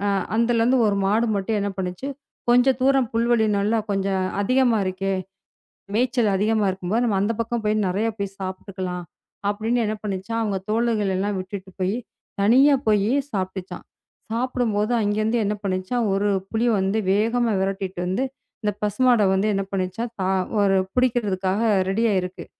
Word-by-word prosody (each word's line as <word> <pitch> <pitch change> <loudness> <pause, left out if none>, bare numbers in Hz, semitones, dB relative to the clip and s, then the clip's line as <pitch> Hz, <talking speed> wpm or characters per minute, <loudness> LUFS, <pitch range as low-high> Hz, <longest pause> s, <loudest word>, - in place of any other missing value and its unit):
அ - - +2 0.2
அந்தல 235 0 +2
இருந்து 250 +3 +3
1 200 - +1
மாடு 220 +4 +2
மட்டும் 200 +2 -1
என்ன 200 0 -1
பண்ணுச்சு? 180 +7 -4 0.4
"கொஞ்சம் 250 +1 +4
தூரம் 265 -3 +3
புல்வெளி 230 -1 +3
நல்லா, 210 +3 +1
கொஞ்சம் 195 -1 0 0.2
அதிகமா 245 +1 +3
இருக்கே! 190 +1 -1 0.8
மேய்ச்சல் 240 -2 +2
அதிகமா 215 +2 +1
இருக்கும்போது, 190 +5 -1
நாம 200 -4 +1
அந்த 210 +3 +1
பக்கம் 230 0 -3
போய் 215 0 +2
நெறைய 205 +5 0
போய் 195 -1 -4
சாப்பிட்டுக்கலாம்." 185 -1 -5 0.5
அப்படின்னு 220 +4 0
என்ன 215 +1 -2
பண்ணுச்சாம். 205 +3 -3
அவங்க 205 -3 -1
தோழர்கள் 220 -3 +1
எல்லாம் 205 +1 -1
விட்டுட்டு 190 0 -7
போயி, 190 +4 0 0.5
தனியா 265 +7 +6
போயி 210 +2 +3 0.2
சாப்பிடுச்சாம். 190 -2 -4 0.5
சாப்பிடும்போது, 235 -3 0
அங்க 205 -1 0
இருந்து 220 +2 +1
என்ன 205 +1 0
பண்ணுச்சாம்? 190 +5 -1
1 200 +1 +1 0.2
புலி 225 +2 0
வந்து 195 +3 0
வேகமா 230 +3 +2
விரட்டிட்டு 195 -1 -2
வந்து, 190 +8 0 0.4
இந்த 210 - 0
பசுமாட 240 +3 +3
வந்து 195 +3 +1
என்ன 195 - 0
பண்ணுச்சாம்? 195 +5 -2
தா 185 - 0 0.3
ஒரு 195 -1 +3 0.2
புடிக்கிறதுக்காக 210 -6 +1 0.3
ரெடியா 220 +3 +2
இருக்கு. 180 0 -6
210 Hz, 150 wpm, -23 LUFS, 195-230 Hz, 0.8 s, தனியா